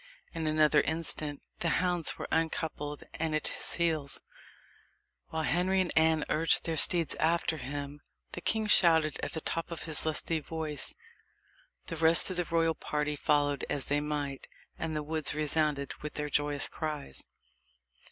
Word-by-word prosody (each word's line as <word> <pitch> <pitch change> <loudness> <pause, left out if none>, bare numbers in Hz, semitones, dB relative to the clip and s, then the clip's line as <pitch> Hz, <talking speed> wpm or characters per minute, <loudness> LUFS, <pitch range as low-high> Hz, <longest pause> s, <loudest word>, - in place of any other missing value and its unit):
In 165 -1 -3
another 155 -1 +4
instant 155 -2 -1 0.2
the 170 - 0
hounds 180 -2 0
were - - -5
un 160 0 +2
coupled 150 -3 -5 0.2
and 160 -1 0
at 155 - +1
his - - -3
heels, 160 -5 -1 1.1
while 160 0 -3
Henry 180 +4 +2
and 185 -2 0
Anne 160 -1 +4
urged 165 +2 +2
their 165 - -2
steeds 170 0 +5
after 165 0 +1
him, 145 +1 -6 0.3
the 175 - -6
king 220 +3 +1
shouting 165 -6 +5
at - - -4
the 160 - -3
top 165 +2 -3
of 170 - -5
his 155 -3 -1
lusty 160 +1 -1
voice. 155 -1 -2 0.9
The 165 - -6
rest 165 +3 +4
of 185 - -3
the 175 - 0
royal 165 -1 +1
party 150 -1 -2
followed 145 -1 +1
as 140 - 0
they 145 +1 +1
might, 145 -2 -3 0.3
and 160 -1 -4
the 150 - -2
woods 155 0 0
resounded 150 -2 0
with 150 - -6
their 150 -1 -3
joyous 145 0 0
cries. 150 - -5
155 Hz, 160 wpm, -30 LUFS, 150-165 Hz, 1.1 s, steeds